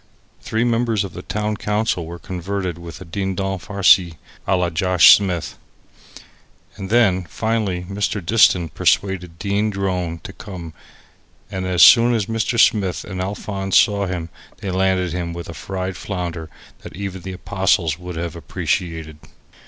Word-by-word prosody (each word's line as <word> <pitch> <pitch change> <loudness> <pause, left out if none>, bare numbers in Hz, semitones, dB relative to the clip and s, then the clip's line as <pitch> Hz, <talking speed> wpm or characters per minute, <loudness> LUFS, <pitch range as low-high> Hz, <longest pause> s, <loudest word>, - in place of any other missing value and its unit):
Three 110 +1 -1
members 115 -3 +1
of 95 -4 -7
the 90 - -7
town 105 +2 -3
council 105 -6 -1
were 85 +1 -7
converted 90 0 -4
with 85 +1 -10
a - - -8
Dindon 95 +2 -3
farci 90 -3 +3 0.3
a 95 - +3
la 90 -1 0
Josh 90 +2 +7
Smith. 90 -5 -3 1.2
And 95 -2 -7
then, 100 -6 +3
finally, 105 -1 -2
Mr. 100 +2 -2
Diston 90 -4 +4
persuaded 90 +1 0
Dean 100 +2 0
Drone 90 -4 -2
to - - -8
come, 90 -5 -9 0.8
and 95 0 -3
as 90 -2 +4
soon 120 0 +7
as 110 -3 0
Mr. 115 +1 -1
Smith 95 -6 +3
and 95 -2 -5
Alphonse 95 0 -1
saw 100 -2 +3
him 85 -2 -4 0.3
they 95 - -5
landed 95 -2 +1
him 85 -1 -3
with 85 0 -7
a 85 - -7
fried 95 +5 -5
flounder 85 -5 -5 0.3
that - - -10
even 95 -1 -5
the 95 +1 -6
apostles 90 -4 0
would 90 -1 -7
have 85 -1 -4
appreciated. 80 -3 -3
95 Hz, 150 wpm, -20 LUFS, 85-100 Hz, 1.2 s, Josh